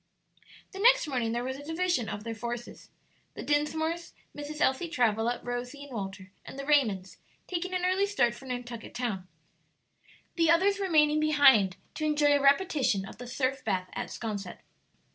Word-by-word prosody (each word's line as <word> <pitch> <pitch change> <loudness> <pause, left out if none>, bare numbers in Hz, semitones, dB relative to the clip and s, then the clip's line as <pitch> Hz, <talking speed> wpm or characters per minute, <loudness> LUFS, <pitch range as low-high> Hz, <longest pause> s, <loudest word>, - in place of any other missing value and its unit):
The 385 - -9
next - - +5
morning 245 -5 -1
there 240 +1 -1
was 260 +1 -4
a 285 - -10
division 325 - 0
of 205 - -5
their 230 0 -4
forces: 235 +2 -6 0.5
the - - -6
Dinsmores, 315 +3 -1 0.2
Mrs. 295 +1 -6
Elsie 265 +6 +2
Travilla, 235 -3 +1
Rosie, 245 +3 -5
and 285 - -12
Walter, 195 -2 -6
and - - -10
the 275 - -5
Raymonds 220 -11 +1 0.3
taking 365 0 -3
an 360 0 0
early 380 +2 +2
start 245 -13 +2
for 265 +3 -12
Nantucket 245 -2 -6
Town, 220 -7 -3 1.1
the 330 -1 +3
others 390 +4 +4
remaining 305 -5 +3
behind 270 -11 +5 0.2
to 310 - -3
enjoy 295 -1 +3
a 285 - +2
repetition 280 - +3
of - - -12
the 245 - -7
surf 260 +2 -1
bath 185 -4 -2
at - - -4
'Sconset. 200 -5 -5
270 Hz, 165 wpm, -29 LUFS, 230-310 Hz, 1.1 s, next